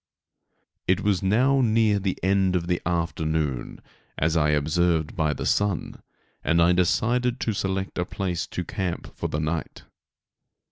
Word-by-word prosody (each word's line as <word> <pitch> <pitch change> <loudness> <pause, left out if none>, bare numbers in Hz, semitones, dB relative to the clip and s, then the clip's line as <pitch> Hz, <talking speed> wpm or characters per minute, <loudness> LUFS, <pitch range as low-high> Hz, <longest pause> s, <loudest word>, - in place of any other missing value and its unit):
It 95 - +2
was 100 -4 +1
now 130 +8 +3
near 110 -3 +3
the 95 -1 -2
end 95 -1 +2
of 85 -2 0
the 90 0 -1
afternoon, 80 -5 -1 0.4
as 80 +2 +1
I 75 -2 +3
observed 80 +2 +1
by 80 -3 +1
the 75 - -4
sun, 100 -3 0 0.4
and 85 - +2
I 85 +1 +5
decided 120 +8 +1
to 110 - 0
select 95 -1 -2
a 90 - 0
place 90 -2 -3
to - - -4
camp 90 -3 -4
for - - -3
the 75 - -2
night. 80 0 -3
90 Hz, 150 wpm, -25 LUFS, 80-100 Hz, 0.4 s, I